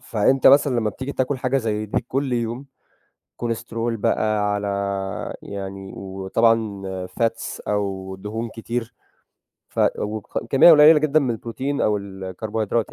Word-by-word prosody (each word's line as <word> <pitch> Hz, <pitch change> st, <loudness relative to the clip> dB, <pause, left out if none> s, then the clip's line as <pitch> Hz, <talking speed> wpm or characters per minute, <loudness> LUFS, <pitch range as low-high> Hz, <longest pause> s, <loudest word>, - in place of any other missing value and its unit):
فأنت 125 Hz, +5 st, +2 dB
مثلًا 140 Hz, -2 st, +6 dB
لمّا 105 Hz, -1 st, 0 dB
بتيجي 130 Hz, +6 st, -6 dB
بتاكل 130 Hz, +1 st, -1 dB
حاجة 130 Hz, +1 st, 0 dB
زي 110 Hz, -2 st, -2 dB
دي -, -, 0 dB
كل 135 Hz, -1 st, -1 dB
يوم، 120 Hz, +3 st, -2 dB, 0.7 s
كوليسترول 115 Hz, 0 st, -3 dB
بقى 105 Hz, 0 st, +1 dB
على 100 Hz, 0 st, -2 dB, 0.7 s
يعني 95 Hz, -1 st, -7 dB
وطبعًا 100 Hz, +2 st, 0 dB, 0.3 s
fats 115 Hz, +3 st, -2 dB
أو 95 Hz, -2 st, -2 dB
دهون 110 Hz, +4 st, -5 dB
كتير 115 Hz, +1 st, -5 dB, 0.8 s
ف -, -, -3 dB, 0.2 s
وك 105 Hz, +1 st, -4 dB
كمية 135 Hz, +5 st, +8 dB
قليلة 150 Hz, +1 st, +8 dB
جدًا 155 Hz, 0 st, +2 dB
من 130 Hz, -3 st, 0 dB
البروتين 130 Hz, +5 st, -3 dB
أو 105 Hz, -1 st, +2 dB
الكربوهيدرات 100 Hz, +3 st, -3 dB
115 Hz, 130 wpm, -22 LUFS, 105-130 Hz, 0.8 s, كمية